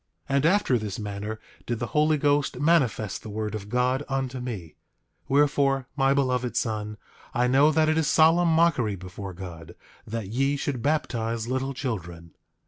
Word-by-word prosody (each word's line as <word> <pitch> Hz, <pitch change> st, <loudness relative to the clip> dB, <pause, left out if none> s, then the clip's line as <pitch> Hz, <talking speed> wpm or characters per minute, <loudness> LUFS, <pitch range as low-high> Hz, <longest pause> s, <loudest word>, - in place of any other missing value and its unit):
8:9 -, -, +2 dB
And 140 Hz, +2 st, +2 dB
after 180 Hz, -9 st, +3 dB
this 105 Hz, -3 st, -5 dB
manner 105 Hz, +1 st, -5 dB, 0.3 s
did 120 Hz, -, -1 dB
the 120 Hz, -, -3 dB
Holy 155 Hz, 0 st, +3 dB
Ghost 145 Hz, -2 st, +1 dB
manifest 135 Hz, -, +1 dB
the 110 Hz, -, -9 dB
word 105 Hz, 0 st, -3 dB
of 105 Hz, -1 st, -6 dB
God 125 Hz, +3 st, +1 dB
unto 135 Hz, -1 st, -2 dB
me; 105 Hz, -11 st, -6 dB, 0.5 s
wherefore, 140 Hz, -1 st, +2 dB
my 135 Hz, -1 st, +3 dB
beloved 130 Hz, -3 st, 0 dB
son, 105 Hz, -1 st, -2 dB, 0.4 s
I 125 Hz, -, +3 dB
know 135 Hz, +5 st, +5 dB
that 155 Hz, 0 st, +3 dB
it 155 Hz, +1 st, +2 dB
is 155 Hz, -, +1 dB
solemn 165 Hz, +3 st, +5 dB
mockery 160 Hz, -10 st, +2 dB
before 95 Hz, +1 st, -8 dB
God, 85 Hz, -2 st, -9 dB, 0.3 s
that 115 Hz, -1 st, -4 dB
ye 135 Hz, +5 st, +1 dB
should 140 Hz, -3 st, -3 dB
baptize 115 Hz, -6 st, -1 dB
little 130 Hz, +2 st, -2 dB
children. 85 Hz, -, -5 dB
125 Hz, 165 wpm, -26 LUFS, 105-145 Hz, 0.5 s, know